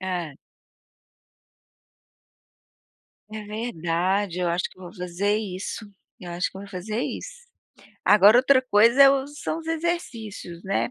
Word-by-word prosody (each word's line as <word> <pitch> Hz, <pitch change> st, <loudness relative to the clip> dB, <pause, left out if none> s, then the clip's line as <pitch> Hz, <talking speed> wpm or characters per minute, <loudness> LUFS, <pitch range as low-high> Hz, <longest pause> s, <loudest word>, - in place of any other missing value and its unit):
Hã. 175 Hz, -6 st, -4 dB, 3.0 s
É 215 Hz, -1 st, -6 dB
verdade, 190 Hz, -3 st, -2 dB
eu 175 Hz, -1 st, 0 dB
acho 170 Hz, +1 st, -1 dB
que -, -, -21 dB
eu 185 Hz, -, -11 dB
vou 175 Hz, -, -11 dB
fazer 180 Hz, +3 st, -1 dB
isso, 205 Hz, +1 st, -5 dB, 0.4 s
eu 175 Hz, -1 st, -8 dB
acho 175 Hz, +1 st, -1 dB
que -, -, -13 dB
eu -, -, -8 dB
vou 200 Hz, -, -12 dB
fazer 210 Hz, +4 st, -4 dB
isso. -, -, -6 dB, 0.6 s
Agora 210 Hz, +2 st, +7 dB
outra 260 Hz, +1 st, +5 dB
coisa 235 Hz, +3 st, +5 dB
é 275 Hz, -, +9 dB
o 275 Hz, 0 st, 0 dB
são 295 Hz, +2 st, -5 dB
os 325 Hz, -, -10 dB
exercícios, 260 Hz, -, -4 dB
né. 195 Hz, +5 st, -1 dB
205 Hz, 145 wpm, -24 LUFS, 180-255 Hz, 3.0 s, é